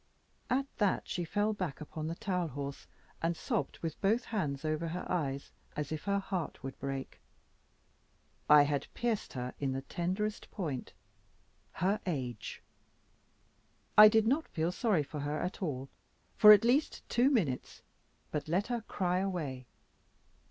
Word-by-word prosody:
At 270 +2 +2
that, 205 -3 +1
she 175 - -2
fell 205 +5 0
back 185 -8 -4
upon 155 0 -5
the 165 - -3
towel 180 -2 -1
horse, 140 -1 -6 0.3
and 165 0 0
sobbed 230 -5 -2
with 165 -2 -4
both 220 +5 +3
hands 155 -10 -2
over 155 +2 -1
her 175 +3 -4
eyes, 140 -6 -2 0.2
as 150 -1 -3
if 155 - -4
her 200 0 +2
heart 190 -6 -3
would 135 0 -6
break. 135 0 -5 1.3
I 150 -1 +9
had 145 -1 -1
pierced 235 -3 -1
her 125 -1 -4
in 135 -2 0
the 135 0 -3
tenderest 190 +8 -2
point 150 - -4 0.8
her 195 +5 +1
age. 130 -8 -4 1.3
I 215 0 +11
did 220 0 +4
not 280 +7 +2
feel 165 +2 -1
sorry 185 -4 +1
for 150 +1 -7
her 145 +1 -2
at 180 - -4
all 135 -7 -2 0.5
for 210 -1 +10
at 210 +1 +8
least 270 +6 +1
two 245 +3 +3
minutes, 175 - -1 0.5
but 150 - -2
let 180 +6 +1
her 235 - -1
cry 180 -4 0
away. 155 -10 -3
170 Hz, 150 wpm, -32 LUFS, 145-205 Hz, 1.3 s, I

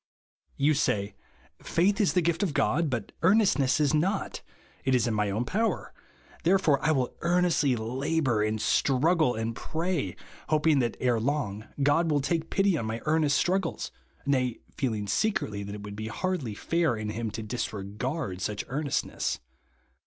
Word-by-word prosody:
You 145 +3 +3
say. 100 -7 0 0.5
Faith 195 +5 +2
is 200 - +2
the 180 - +2
gift 170 +2 +1
of 180 -8 0
God, 160 +1 +2
but 120 -5 -3
earnestness 185 -8 +4
is 150 -1 +2
not; 185 +6 0 0.4
it 130 -1 +2
is 120 -3 +2
in 115 - 0
my 105 -1 +1
own 110 +5 -1
power; 220 - -1 0.5
therefore 165 -6 +3
I 155 - +2
will 130 -5 0
earnestly 170 -6 +2
labour, 130 +1 0
and 110 +1 0
struggle, 145 +4 +2
and 115 +1 -2
pray, 160 - -2 0.3
hoping 155 -1 +3
that 120 -3 -1
ere 125 -2 +2
long 110 -5 -2 0.2
God 160 +4 +3
will 145 -2 +3
take 160 +3 -1
pity 195 -2 +2
on 110 - -3
my 110 +1 -3
earnest 155 -2 +3
struggles, 185 -1 0 0.3
nay, 130 -4 +1 0.2
feeling 110 -7 -1
secretly 100 - 0
that 100 +1 -6
it 105 - -8
would 105 0 -7
be 110 +1 -5
hardly 145 - -2
fair 165 +1 +1
in 110 -1 -4
him 110 +1 -3
to 110 +2 -5
disregard 105 - -4
such 105 +2 -2
earnestness. 145 +1 -1
140 Hz, 160 wpm, -28 LUFS, 110-165 Hz, 0.5 s, earnestness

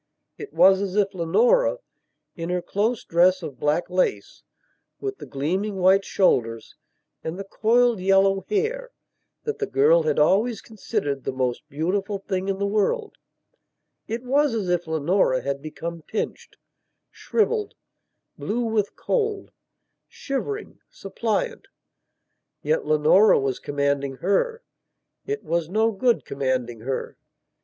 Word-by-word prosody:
It 425 - -8
was 190 0 +5
as 195 -1 -3
if 205 -1 +2
Leonora, - - +3 0.6
in 165 -1 -5
her 180 -1 -1
close 215 +3 -1
dress 180 +2 +3
of 140 -6 -7
black 150 +3 +1
lace, 180 - -1 0.6
with 400 0 -5
the - - -9
gleaming 185 +9 -2
white 190 +1 +4
shoulders 115 - +1 0.5
and 160 +2 -4
the 195 - -5
coiled 230 +3 +2
yellow 195 +1 +3
hair 470 +4 -1 0.5
that 445 -2 -4
the 420 - -1
girl 465 +6 +4
had 470 0 0
always 220 - +3
considered 200 - -4
the - - -2
most 130 -2 -2
beautiful 195 +7 -1
thing 190 -1 -3
in 195 -1 -1
the 200 - -1
worldit 215 - 0 1.1
was 275 0 +2
as 200 -5 -2
if 175 -1 0
Leonora 160 -3 +1
had 140 0 -3
become 165 +2 -6
pinched, 215 - -5 0.5
shrivelled, 435 -2 -1 0.6
blue 240 +3 -2
with 220 -3 -1
cold, 430 -4 -2 0.6
shivering, 410 +11 -5
suppliant. - - -3 1.0
Yet 480 +1 0
Leonora 155 +8 +5
was 135 -2 -2
commanding 140 -1 -1
her. 455 - 0 0.6
It 425 +1 -3
was 170 -1 -1
no 220 +4 +2
good 235 +3 +1
commanding 130 -4 -2
her. 130 +4 -4
195 Hz, 130 wpm, -24 LUFS, 160-255 Hz, 1.1 s, was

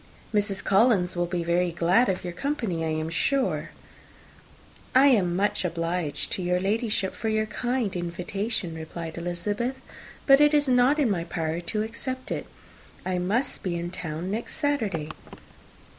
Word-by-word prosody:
Mrs. 205 -2 +1
Collins 195 -3 +3
will 175 0 0
be 175 -1 -2
very 175 +1 +2
glad 175 +8 +3
of 185 - -1
your 175 -1 -4
company, 225 - -2
I - - 0
am 155 0 -1
sure." 270 +9 +1 1.3
"I 275 +2 +8
am 185 -9 +3
much 205 +2 +1
obliged 165 -3 -2
to 195 - -2
your 180 0 +1
Ladyship 205 0 0
for 225 - -3
your 215 0 +1
kind 240 -3 -1
invitation," 180 +2 -3
replied 160 +1 -6
Elizabeth; 205 +9 -2 0.5
"but 275 +1 +7
it 295 0 +6
is 290 -1 +3
not 255 +3 +4
in 275 -8 +2
my 170 -4 -1
power 165 -1 -2
to 210 +5 -2
accept 255 +4 -5
it. - - -3 0.6
I 185 -1 0
must 210 +9 0
be 180 -2 -2
in 170 +1 -4
town 170 0 -4
next 225 +3 -4
Saturday." 220 - -1
190 Hz, 160 wpm, -26 LUFS, 175-235 Hz, 1.3 s, I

